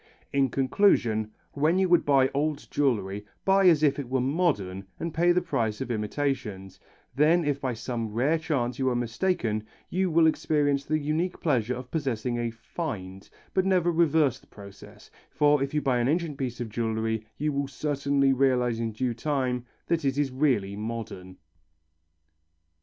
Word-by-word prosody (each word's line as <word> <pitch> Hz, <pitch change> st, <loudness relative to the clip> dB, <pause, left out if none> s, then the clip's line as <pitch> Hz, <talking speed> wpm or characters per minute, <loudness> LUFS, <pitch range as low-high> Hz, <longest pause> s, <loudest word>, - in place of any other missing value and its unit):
In 135 Hz, -1 st, +3 dB
conclusion, 120 Hz, -, +2 dB, 0.2 s
when 155 Hz, +5 st, +1 dB
you 190 Hz, 0 st, +3 dB
would 175 Hz, -1 st, +4 dB
buy 135 Hz, -2 st, +4 dB
old 145 Hz, +1 st, -1 dB
jewellery 105 Hz, -8 st, 0 dB, 0.2 s
buy 195 Hz, 0 st, +5 dB
as 160 Hz, -4 st, +5 dB
if 145 Hz, -1 st, +3 dB
it 135 Hz, -4 st, -5 dB
were 130 Hz, 0 st, +1 dB
modern 125 Hz, -, 0 dB
and 165 Hz, -1 st, -4 dB
pay 175 Hz, +2 st, +3 dB
the 180 Hz, +1 st, +2 dB
price 110 Hz, -2 st, -1 dB
of 125 Hz, -, -4 dB
imitations, 105 Hz, -4 st, -3 dB, 0.3 s
then 160 Hz, +4 st, +3 dB
if 140 Hz, -1 st, -1 dB
by 130 Hz, -3 st, -2 dB
some 115 Hz, -1 st, -4 dB
rare 135 Hz, +9 st, +1 dB
chance 130 Hz, -6 st, -2 dB
you 130 Hz, -1 st, +2 dB
are 125 Hz, -, -1 dB
mistaken 120 Hz, -, -1 dB, 0.3 s
you 185 Hz, +1 st, +1 dB
will 165 Hz, 0 st, +4 dB
experience 145 Hz, -3 st, +1 dB
the 155 Hz, -, +1 dB
unique 155 Hz, +4 st, -2 dB
pleasure 125 Hz, -6 st, 0 dB
of 125 Hz, 0 st, -9 dB
possessing 125 Hz, -6 st, -2 dB
a 120 Hz, 0 st, -1 dB
"find," 110 Hz, -, -6 dB, 0.2 s
but 190 Hz, -, +2 dB
never 180 Hz, -2 st, +2 dB
reverse 160 Hz, -5 st, +2 dB
the -, -, -25 dB
process, 100 Hz, -1 st, -14 dB, 0.2 s
for 145 Hz, -1 st, +3 dB
if 135 Hz, 0 st, -1 dB
you 150 Hz, -1 st, -1 dB
buy 130 Hz, -3 st, +2 dB
an 120 Hz, -, +1 dB
ancient 160 Hz, 0 st, 0 dB
piece 130 Hz, -3 st, -4 dB
of 120 Hz, -2 st, -4 dB
jewellery 110 Hz, 0 st, -2 dB
you 150 Hz, +1 st, -1 dB
will 140 Hz, 0 st, -1 dB
certainly 140 Hz, -1 st, +1 dB
realize 125 Hz, -3 st, +2 dB
in 115 Hz, -1 st, -2 dB
due 125 Hz, +2 st, -1 dB
time 125 Hz, -1 st, -2 dB, 0.2 s
that 165 Hz, -2 st, 0 dB
it 135 Hz, -1 st, 0 dB
is 145 Hz, -2 st, +1 dB
really 130 Hz, -8 st, +1 dB
modern. 105 Hz, -4 st, -6 dB
135 Hz, 170 wpm, -27 LUFS, 115-155 Hz, 0.3 s, buy